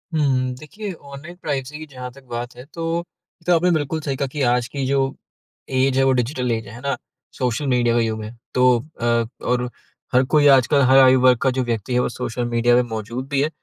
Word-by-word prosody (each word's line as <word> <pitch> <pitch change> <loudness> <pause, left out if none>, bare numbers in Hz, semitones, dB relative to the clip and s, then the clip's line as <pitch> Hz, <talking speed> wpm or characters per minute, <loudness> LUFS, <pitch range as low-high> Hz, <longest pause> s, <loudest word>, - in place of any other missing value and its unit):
हुँ, 130 -4 +1
देखिए, 200 +8 -7
online 145 +2 -11
privacy 140 0 -3
की 155 - -7
जहाँ 125 -3 -8
तक 135 +2 -16
बात 120 +1 -5
है, 125 - -10
तो 165 0 -1 0.6
आपने 175 +2 +3
बिल्कुल 160 -1 0
सही 140 -2 -2
कहा 140 - -1
कि 145 +3 -5
आज 120 -1 +1
की 135 +2 -3
जो 135 0 +1 0.6
ऐज 130 0 +2
है, 135 - +4
वो 135 - +4
डिजिटल 125 0 -1
ऐज 110 -1 -2
है, - - -10
है 120 - -9
ना? 140 0 -1 0.4
सोशल 125 +3 -1
मीडिया 120 -2 +2
का - - +3
युग 110 -1 -2
है। 110 +3 -8 0.2
तो 125 - +2 0.4
अ 120 0 +2 0.2
और 125 0 0 0.4
हर 125 +1 +5
कोई, 145 +2 +4
आजकल 135 +1 +5
हर 130 0 +5
आयु 130 -1 +6
वर्ग 125 -1 +6
का 135 - +3
जो 130 - +2
व्यक्ति 120 0 -2
है, 125 - +3
वो - - +1
सोशल 120 +1 -3
मीडिया 120 0 +2
में 125 - +5
मौजूद 115 +4 -5
भी 140 -2 +1
है। 150 - +1
130 Hz, 225 wpm, -21 LUFS, 120-140 Hz, 0.6 s, आयु